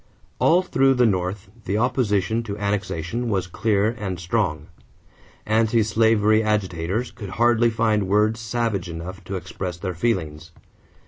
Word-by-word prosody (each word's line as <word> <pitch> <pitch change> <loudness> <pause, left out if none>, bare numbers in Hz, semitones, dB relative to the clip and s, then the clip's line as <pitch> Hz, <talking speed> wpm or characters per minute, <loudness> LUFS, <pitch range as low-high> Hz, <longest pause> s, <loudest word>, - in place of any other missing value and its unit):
= - - -35
All 180 +3 +4
through 135 -6 +3
the 125 -1 +4
North 95 0 -1
the 100 +3 -1
opposition 110 -3 +1
to 105 -3 -6
annexation 100 +2 -2
was 95 -4 0
clear 105 +3 +1
and 95 -4 -4
strong. 85 -5 -1 0.8
Anti 110 +1 +2
slavery 110 0 +3
agitators 100 0 -1
could 105 -5 -8
hardly 120 0 +4
find 110 -3 +1
words 105 +3 +2
savage 110 -5 -2
enough 90 +4 -7
to 95 - -4
express 90 -1 -5
their 90 0 -4
feelings. 80 -6 -2
105 Hz, 140 wpm, -23 LUFS, 95-115 Hz, 0.8 s, All